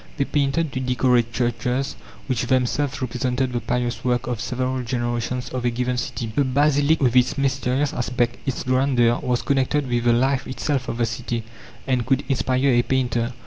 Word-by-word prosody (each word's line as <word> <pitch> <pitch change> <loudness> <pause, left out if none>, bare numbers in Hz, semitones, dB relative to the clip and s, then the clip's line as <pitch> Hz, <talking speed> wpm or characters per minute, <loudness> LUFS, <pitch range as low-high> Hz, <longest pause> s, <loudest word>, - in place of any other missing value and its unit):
They 140 - +1
painted 145 +2 0
to 130 - -2
decorate 125 -2 +2
churches 125 +3 -1 0.3
which 125 -3 -1
themselves 130 +2 0
represented 125 +1 -1
the 120 - 0
pious 120 +1 -2
work 125 -1 0
of 120 -3 -3
several 130 0 -2
generations 120 0 -2
of 130 -1 -4
a 120 - +2
given 125 +1 -1
city. 120 -2 -4
The 145 - +3
basilic 145 +3 +3
with 125 -1 +2
its 125 +3 +3
mysterious 135 0 0
aspect, 120 -1 -1
its 130 - -2
grandeur, 130 -2 +2
was 125 -1 0
connected 140 +1 +1
with 120 -1 -1
the 120 - +5
life 130 +2 +1
itself 130 0 -2
of 115 - -3
the 120 - +2
city, 115 0 -3 0.4
and 130 -2 +1
could 135 +2 +1
inspire 130 0 +1
a 120 -1 +4
painter. 120 -2 0
125 Hz, 180 wpm, -23 LUFS, 120-135 Hz, 0.4 s, the